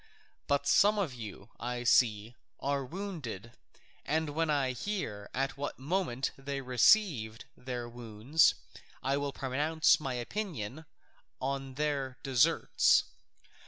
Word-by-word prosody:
But 140 0 +1
some 205 +9 +5
of 185 -10 -1
you, 110 -3 -9
I 120 +1 -3
see, 115 -1 +3 0.2
are 140 0 -1
wounded, 135 - -6 0.5
and 155 +1 -1
when 160 +2 0
I 140 -3 +2
hear 125 - -4
at 135 0 -2
what 145 +1 -4
moment 140 -3 -1
they 140 0 -4
received 125 - +3
their 125 -2 -5
wounds 120 +5 +2 0.5
I 135 +1 +1
will 145 0 -2
pronounce 150 +5 +2
my 135 -4 -3
opinion 150 - -4 0.5
on 135 0 -3
their 140 -3 -1
deserts. 130 -4 +4
135 Hz, 120 wpm, -31 LUFS, 120-150 Hz, 0.5 s, some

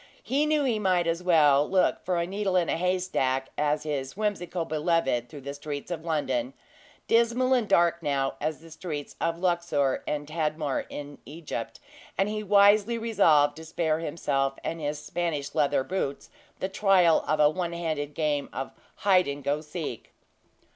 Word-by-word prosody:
He 285 +3 +1
knew 305 -1 +2
he 240 -5 +1
might 185 -4 +2
as 165 +1 -1
well 150 -5 +4
look 190 -1 +2
for 180 -1 0
a 170 - 0
needle 195 +1 -2
in 175 -2 +2
a - - +1
haystack 175 -7 0
as 150 0 0
his 140 -1 -4
whimsical 185 -5 -2
beloved 155 -6 0
through 145 +2 -10
the 140 +1 -6
streets 145 +2 -6
of 165 -2 -4
London 135 -6 -1 0.5
dismal 235 +3 +3
and 240 -5 +1
dark 170 0 +3
now 140 -3 0
as 155 +1 -2
the 165 0 -14
streets 155 -3 -6
of 165 0 0
Luxor 170 -6 0
and 145 -1 -2
Tadmor 155 -2 -2
in 145 0 -8
Egypt; 145 -6 -6 0.4
and 195 +2 +2
he 215 0 -3
wisely 205 +2 +4
resolved 165 -11 +3
to 160 - -9
spare 160 -1 -1
himself 140 -4 -1
and 165 0 -4
his 145 0 -2
Spanish 150 -2 -3
leathers 145 -3 +1
boots 180 -7 -3 0.3
the 190 - -2
trial 190 -4 +4
of 155 0 +1
a 150 - +7
one 175 0 -3
handed 155 -4 -3
game 150 -3 -1
of 135 - -5 0.2
"hide 185 -4 +3
and 140 0 -5
go 145 +2 +1
to - - -8
seek." 150 -6 -6
160 Hz, 175 wpm, -27 LUFS, 145-185 Hz, 0.5 s, a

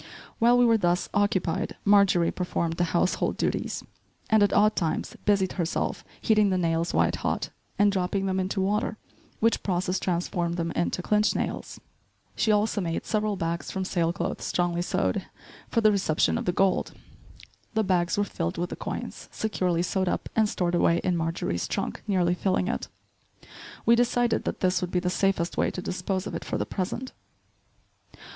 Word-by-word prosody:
While 240 +2 +5
we 245 - +5
were 230 -1 +4
thus 175 -1 +1
occupied 195 -2 0
Marjorie 200 -4 +5
performed 170 -2 -2
the 175 - +2
house 175 +2 +1
hold - - 0
duties, - - -1 0.5
and, 220 -1 +5
at 205 - +4
odd 210 +1 +4
times, 160 -4 -2
busied 200 -3 +3
herself 165 - -2 0.2
heating 215 -2 +3
the 185 - +1
nails 165 -1 0
white - - +2
hot, - - -2 0.3
and 205 0 +4
dropping 195 0 -1
them 190 0 0
into 190 +1 -1
water, 210 +3 0 0.4
which 230 +1 +3
process 185 0 -1
transformed 175 -1 -1
them 165 -1 -1
into 175 +1 -1
"clinch" 210 +2 +2
nails. - - -3 0.6
She 220 - +2
also 210 0 +2
made 165 -2 -2
several 215 -1 0
bags 170 -1 -3
from 190 -1 -3
sail 170 -3 +1
cloth - - -3
strongly 175 -1 0
sewed, 95 - -1 0.4
for 230 - +1
the 215 -1 +5
reception 185 -6 +2
of - - -2
the 180 - +2
gold. 190 +1 +1 0.8
The 220 - +3
bags 180 -2 +1
were 205 - +3
filled 85 - -3
with 175 +1 -2
the - - -3
coins, - - -6
securely 180 -5 0
sewed 185 0 0
up - - -2
and 220 -1 +3
stored 175 -3 -1
away 170 -1 +3
in 180 -1 +1
Marjorie's 165 - -2
trunk, 195 - -3
nearly 180 -3 +2
filling 185 0 0
it. - - -3 1.0
We 235 - +6
decided 240 -1 +1
that - - -3
this 180 0 +2
would 180 - -2
be 180 - +1
the 180 0 -1
safest 185 -2 0
way - - +2
to - - -6
dispose 185 +1 -2
of - - -5
it - - -4
for - - -3
the - - -1
present. 215 +7 -4
185 Hz, 180 wpm, -27 LUFS, 175-205 Hz, 1.0 s, We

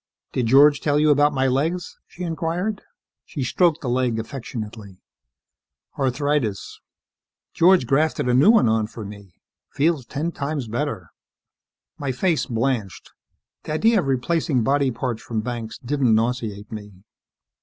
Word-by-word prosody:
"Did 125 -3 0
George 140 +3 +6
tell 145 -1 +1
you 150 0 +4
about 145 +1 +4
my 135 -2 0
legs?" 155 +7 -1
she 180 - -9
inquired. 170 +5 -2 0.4
She 145 - -5
stroked 165 +5 +2
the 135 - -5
leg 125 -2 0
affectionately. 110 -5 -7 1.0
"Arthritis. 135 -5 -1 0.7
George 180 -4 +5
grafted 140 +2 +1
a 125 - +2
new 135 +10 +5
one 225 - +5
on 110 -1 +1
for 110 -1 -9
me. 100 -3 -11 0.3
Feels 145 -3 0
ten 155 +4 -3
times 140 -4 -4
better." 115 - -4 0.9
My 140 -2 -2
face 165 +5 0
blanched. 115 -5 -2 0.5
The 155 - -3
idea 220 +7 +3
of 150 - -2
replacing 135 0 0
body 140 +2 +2
parts 120 -2 -3
from 115 -2 -3
Banks 115 -1 -5
didn't 125 -3 +1
nauseate 110 -3 -2
me. 105 -3 -9
130 Hz, 140 wpm, -22 LUFS, 115-150 Hz, 1.0 s, George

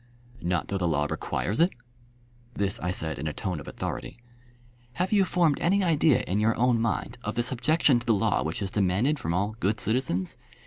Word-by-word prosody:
"Not 90 -1 -1
though 100 - -1
the 90 - 0
law 75 -3 +1
requires 100 +7 -2
it?" 170 +2 +5 0.9
This 100 0 0
I 90 - -2
said 80 -5 -2
in 80 - -3
a 75 - -2
tone 90 -1 -3
of 70 - -11
authority. - - -5 0.8
"Have 180 +6 -1
you 200 -2 +5
formed 170 -5 +2
any 195 +3 +2
idea 155 -4 +3
in 100 +3 -1
your 110 +1 +2
own 120 -1 +3
mind 115 +2 -2
of 105 - -3
the 120 - +1
subjection 130 +2 +2
to - - -11
the 115 - +4
law 95 - +1
which 80 +8 -2
is 95 - -4
demanded 105 +10 +1
from 85 +1 -2
all 100 +4 -1
good 105 0 0
citizens? 110 -6 +1
110 Hz, 205 wpm, -27 LUFS, 90-130 Hz, 0.9 s, it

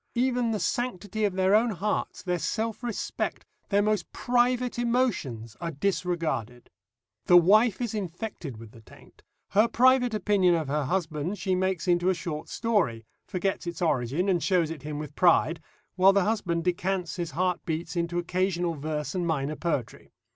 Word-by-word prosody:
Even 245 -1 +1
the 215 -2 -1
sanctity 215 -3 -2
of 200 - 0
their 190 +1 +3
own 225 +3 +4
hearts, 210 +1 -2
their 180 -2 -1
self 225 +6 -2
respect, 240 -4 -3 0.2
their 205 0 +3
most 210 -3 0
private 245 0 +1
emotions 195 - -1
are 170 - -2
disregarded. 165 - -2 0.6
The 175 - +8
wife 205 +5 +5
is 240 -3 -2
infected 180 - -5
with 110 -1 -11
the 115 - -15
taint. - - -18 0.3
Her 210 +4 +4
private 250 0 +4
opinion 195 -4 +3
of 160 -3 -2
her 150 0 0
husband 170 +2 -2
she 185 +1 -1
makes 185 0 -1
into 175 +1 +3
a 190 - +2
short 155 -3 -5
story 175 - 0 0.2
forgets 190 -1 -2
its 170 -1 -5
origin 150 +1 0
and 180 -3 +2
shows 175 -5 +1
it 160 -4 -7
him 150 +1 -5
with 150 -1 -6
pride 165 -1 +3 0.4
while 190 +1 +6
the 200 -1 +3
husband 180 -6 -1
decants 180 0 -1
his 170 -2 -3
heart 180 -1 0
beats 165 +1 -4
into 170 0 -1
occasional 175 0 0
verse 150 -1 -4
and 180 -2 -1
minor 150 -2 -1
poetry. 150 -9 -3
180 Hz, 170 wpm, -27 LUFS, 160-210 Hz, 0.6 s, The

